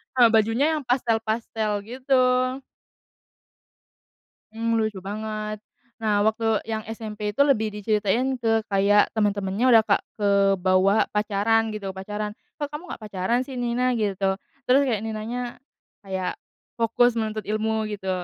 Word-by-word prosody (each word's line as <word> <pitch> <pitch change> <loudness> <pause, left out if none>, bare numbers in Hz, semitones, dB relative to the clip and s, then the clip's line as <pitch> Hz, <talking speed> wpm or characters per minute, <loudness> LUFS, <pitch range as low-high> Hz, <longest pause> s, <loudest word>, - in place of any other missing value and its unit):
Ah, 240 -3 +6
bajunya 225 +8 +2
yang 285 - -9
pastel-pastel 225 -3 -1
gitu. 255 +5 -2 2.4
Mmm, 230 +1 0
lucu 215 -3 -1
banget, 215 +2 -4 0.4
nah 210 -2 +1
waktu 220 0 +1
yang 220 -1 -2
SMP 215 -1 -5
itu 250 - +3
lebih 220 -6 +2
diceritain 215 +5 0
ke 225 -2 +1
kayak 200 +1 +4
temen-temennya 205 +2 +1
udah 225 -1 +8
ka - - +4 0.2
ke 205 -1 +1 0.3
bawa 190 +3 +3
pacaran 215 +2 +1
gitu, 200 -2 -4
pacaran 210 +2 -4 0.2
kok 290 - -2
kamu 295 +2 -6
nggak - - -7
pacaran 210 +3 -1
sih 265 - -7
Nina 245 +1 0
gitu, 195 -3 0 0.3
terus 260 +2 +5
kayak 225 -6 0
Ninanya, 230 +3 -4 0.5
kayak, 190 -1 -3 0.4
fokus 230 +1 +2
menuntut 215 -2 -3
ilmu 220 +1 -1
gitu. 200 -3 -4
220 Hz, 130 wpm, -24 LUFS, 205-230 Hz, 2.4 s, udah